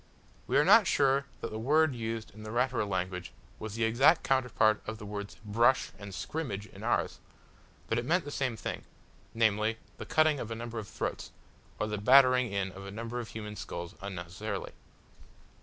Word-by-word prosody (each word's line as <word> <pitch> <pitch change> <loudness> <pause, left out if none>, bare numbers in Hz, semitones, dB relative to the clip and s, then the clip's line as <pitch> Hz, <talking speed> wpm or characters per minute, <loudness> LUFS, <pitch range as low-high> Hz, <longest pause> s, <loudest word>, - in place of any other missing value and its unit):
We - - +2
are - - +5
not 225 -5 +7
sure 140 -1 +3 0.2
that - - -4
the 110 - -4
word 150 +5 +3
used 115 -2 -4
in 110 - -12
the 110 - -7
Ratura 120 -1 0
language 90 -1 -3 0.3
was 110 -1 -6
the 115 - 0
exact 130 +9 +4
counterpart 125 -5 +2
of 110 0 -4
the 105 - -9
words 100 0 -6
"brush" 115 +5 +3
and 100 -1 -8
"scrimmage" 105 - -4
in - - -13
ours, - - 0 0.7
but 115 - +1
it 120 - -4
meant 170 +3 +2
the 145 - -6
same 130 -5 -1
thing, - - -5 0.5
namely, 110 0 +2 0.2
the - - -7
cutting 155 -2 +3
of 115 - -5
a 115 - -3
number 115 0 -5
of 105 - -7
throats, - - -4 0.5
or - - +1
the 105 -1 -3
battering 125 +1 +6
in 100 -1 -1
of 95 +1 -10
a 100 - -7
number 115 +4 -5
of 120 - -5
human 105 -1 -7
skulls 85 -3 -6
unnecessarily. 95 +2 -5
110 Hz, 190 wpm, -30 LUFS, 105-125 Hz, 0.7 s, not